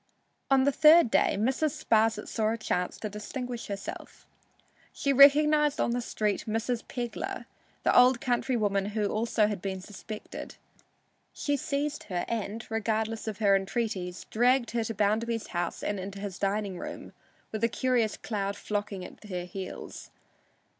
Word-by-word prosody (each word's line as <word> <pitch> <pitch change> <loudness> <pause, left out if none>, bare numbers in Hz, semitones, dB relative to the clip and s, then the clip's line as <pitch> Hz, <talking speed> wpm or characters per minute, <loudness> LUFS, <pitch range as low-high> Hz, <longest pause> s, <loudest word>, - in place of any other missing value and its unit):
On 270 -1 +5
the 280 - +4
third 310 -3 +6
day - - +3
Mrs. 275 +7 0
Sparsit 220 0 +2
saw 215 -2 0
a 230 - -1
chance 180 -5 -2
to 215 - -4
distinguish 235 +4 -5
herself. 200 -1 -7 0.7
She 280 - 0
recognized 295 +2 +6
on - - +1
the 245 +1 0
street 210 -3 -1
"Mrs. 225 +2 -1
Pegler," 240 -3 -4 0.4
the - - +3
old 250 0 +6
countrywoman 225 -6 0
who 210 -2 +1
also 220 0 +1
had 210 -3 -2
been 190 -1 -3
suspected. 210 +2 -8 0.8
She 290 - -1
seized 285 +1 -2
her 180 -3 -2
and, 225 0 -3
regardless 220 0 -1
of 215 -3 -3
her 200 -2 +4
entreaties, 195 -2 -2
dragged 245 +1 +3
her 230 0 0
to 225 - -4
Bounderby's 220 +3 0
house 175 -1 -3
and 205 -1 -1
into 195 +1 -6
his 195 -3 -6
dining 200 -2 -1
room, - - -7 0.4
with 215 0 -4
a 230 - +4
curious 245 -3 +1
crowd 200 -2 -3
flocking 205 -3 -3
at - - -12
their 180 -4 -5
heels. 185 +1 -7
220 Hz, 155 wpm, -29 LUFS, 200-245 Hz, 0.8 s, third